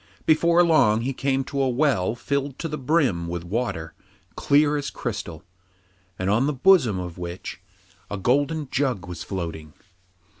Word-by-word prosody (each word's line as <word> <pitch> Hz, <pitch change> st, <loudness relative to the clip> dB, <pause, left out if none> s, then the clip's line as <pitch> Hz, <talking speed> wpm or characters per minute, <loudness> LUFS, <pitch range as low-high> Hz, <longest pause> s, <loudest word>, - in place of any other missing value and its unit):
Before 170 Hz, +2 st, +4 dB
long 115 Hz, -10 st, +4 dB
he 135 Hz, +3 st, -2 dB
came 135 Hz, 0 st, 0 dB
to 140 Hz, +1 st, -3 dB
a 135 Hz, -, +2 dB
well 120 Hz, -6 st, +1 dB
filled 140 Hz, +1 st, -2 dB
to 165 Hz, -, -3 dB
the 150 Hz, -1 st, -5 dB
brim 130 Hz, -, +1 dB
with 85 Hz, 0 st, -4 dB
water 90 Hz, -4 st, -3 dB, 0.4 s
clear 145 Hz, +1 st, +3 dB
as 145 Hz, -1 st, -2 dB
crystal, 100 Hz, -9 st, -5 dB, 0.7 s
and 95 Hz, -, -3 dB
on 110 Hz, +7 st, +2 dB
the 150 Hz, -, 0 dB
bosom 135 Hz, -, +4 dB
of 90 Hz, -1 st, -7 dB
which 85 Hz, 0 st, -7 dB, 0.5 s
a 105 Hz, -, -4 dB
golden 145 Hz, -, +1 dB
jug 130 Hz, -9 st, 0 dB
was 90 Hz, -2 st, -7 dB
floating. 80 Hz, -5 st, -5 dB
125 Hz, 155 wpm, -24 LUFS, 95-145 Hz, 0.7 s, Before